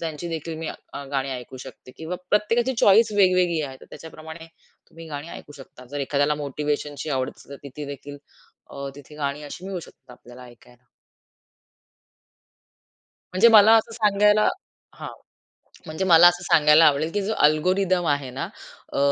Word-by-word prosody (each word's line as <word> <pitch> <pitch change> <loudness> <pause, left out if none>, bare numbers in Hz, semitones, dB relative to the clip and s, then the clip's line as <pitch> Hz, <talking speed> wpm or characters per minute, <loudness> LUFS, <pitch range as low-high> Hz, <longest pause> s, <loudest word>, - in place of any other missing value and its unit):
त्यांची 160 +1 -5
देखील 165 0 -5
मी 165 - -6 0.4
गाणी 135 -1 -2
ऐकू 125 0 -8
शकते 130 0 -12
किंवा 160 +3 -6
प्रत्येकाची 230 +5 +1
चॉईस 215 +3 +5
वेगवेगळी 185 -4 +2
आहे, 135 -2 -7
तर - - -14
त्याच्याप्रमाणे 160 0 -11 0.4
तुम्ही 165 0 -12
गाणी 145 +1 -7
ऐकू 145 - -11
शकता. 130 -2 -14
जर 145 0 -4
एखाद्याला 145 +2 0
मोटिव्हेशनची 145 0 -4
आवड 130 -1 -1
असली 140 - -15
तर - - -8 0.2
ती 150 - -5
देखील 145 0 -9 0.8
तिथे 145 +1 -14
गाणी 145 0 -4
अशी 145 +5 -9
मिळू 190 -3 -5
शकतात 130 - -17
आपल्याला 120 +1 -15
ऐकायला. 120 0 -19 2.5
म्हणजे 185 +6 +5
मला 220 0 +7
असं 225 +1 -1
सांगायला 210 -1 +3 0.5
हां - - -7 0.8
म्हणजे 160 +5 -4
मला 175 -1 +7
असं 175 0 +1
सांगायला 155 -1 +5
आवडेल, 150 +2 +2
की 205 - -1
जो 205 +3 -2
अल्गोरिथम 180 +4 +1
आहे 145 -3 -1
ना 130 - -5 0.5
अ, - - -4
155 Hz, 150 wpm, -23 LUFS, 145-185 Hz, 2.5 s, मला